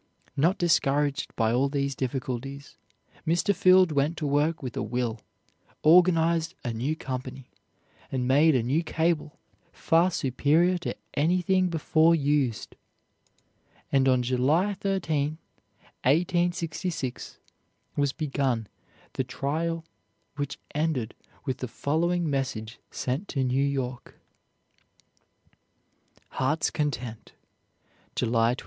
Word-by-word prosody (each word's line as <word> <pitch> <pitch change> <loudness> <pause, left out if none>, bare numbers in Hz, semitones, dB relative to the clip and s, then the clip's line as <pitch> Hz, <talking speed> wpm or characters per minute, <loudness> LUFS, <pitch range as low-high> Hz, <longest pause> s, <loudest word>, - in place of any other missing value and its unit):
Not 165 +7 +2
discouraged 145 -5 +1
by 115 -1 +1
all 135 +3 +2
these 140 -1 -1
difficulties, 135 +1 -4 0.5
Mr. 170 +5 +2
Field 185 -1 +5
went 150 +3 +1
to 155 - -3
work 145 +2 +1
with 125 -1 -5
a 135 - -2
will, 115 0 -2 0.6
organized 165 -1 +4
a 120 - -1
new 130 +8 -1
company, 130 -2 -6 0.6
and 125 -2 -1
made 145 +3 +5
a 125 - +2
new 135 +7 +1
cable 160 -2 -1 0.3
far 165 +3 +2
superior 165 +5 +2
to 175 - -4 0.2
anything 180 +4 +2
before 165 0 +3
used, 140 -7 0 1.2
and 135 -1 +4
on 125 -1 +3
July 140 +11 +2
13, 160 -7 -1 0.7
1866, 170 -1 -1 0.6
was 145 -1 +1
begun 135 -6 -1 0.5
the 130 - -1
trial 160 +6 -2 0.5
which 145 -1 -4 0.2
ended 145 -7 -1 0.3
with 130 -3 -2
the 125 - -3
following 170 +7 0
message 125 -6 -3
sent 135 +11 -3
to 135 -3 -1
New 130 +2 +1
York: 130 -3 -3 2.1
"HEART'S 150 +5 0
CONTENT, 125 -7 -3 0.8
July 115 0 +2
27. - - -10
145 Hz, 110 wpm, -27 LUFS, 130-165 Hz, 2.1 s, Field